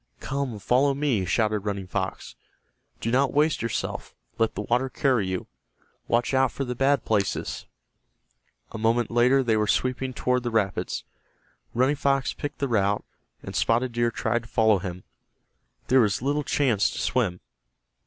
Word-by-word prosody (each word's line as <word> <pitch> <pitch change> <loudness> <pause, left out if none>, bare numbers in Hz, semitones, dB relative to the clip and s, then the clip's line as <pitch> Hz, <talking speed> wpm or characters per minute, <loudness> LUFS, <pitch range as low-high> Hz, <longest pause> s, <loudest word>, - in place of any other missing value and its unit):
"Come, 135 -4 -3
follow 130 +7 +2
me!" 135 -9 0
shouted 105 +3 +1
Running 100 -1 -3
Fox. 95 0 -4 0.7
"Do 115 - -1
not 135 +2 +2
waste 155 +2 +2
yourself. 115 -1 -3 0.2
Let 115 -1 +1
the 105 - -3
water 125 +4 +1
carry 125 -6 +1
you. 95 -1 -3 0.6
Watch 120 +3 +1
out 130 -1 +3
for 135 - -3
the 125 - -3
bad 135 +3 +2
places." 100 -3 -1 1.0
A 110 - -6
moment 115 +1 +1
later 125 +3 +4
they 115 -3 +2
were 105 -1 +1
sweeping 130 +3 0
toward 125 0 0
the 120 - -2
rapids. 110 -5 -1 0.7
Running 130 +4 +2
Fox 135 -1 +1
picked 145 -1 -6
the 140 - -1
route, 100 -4 +1 0.4
and - - -7
Spotted 120 +2 +2
Deer 120 0 +1
tried 115 +1 -1
to 115 - -15
follow 110 -3 +3
him. 90 -1 -6 0.8
There 130 0 +5
was 105 -3 +1
little 145 +2 0
chance 125 -8 +2
to - - -6
swim. 95 -9 0
120 Hz, 160 wpm, -25 LUFS, 105-135 Hz, 1.0 s, There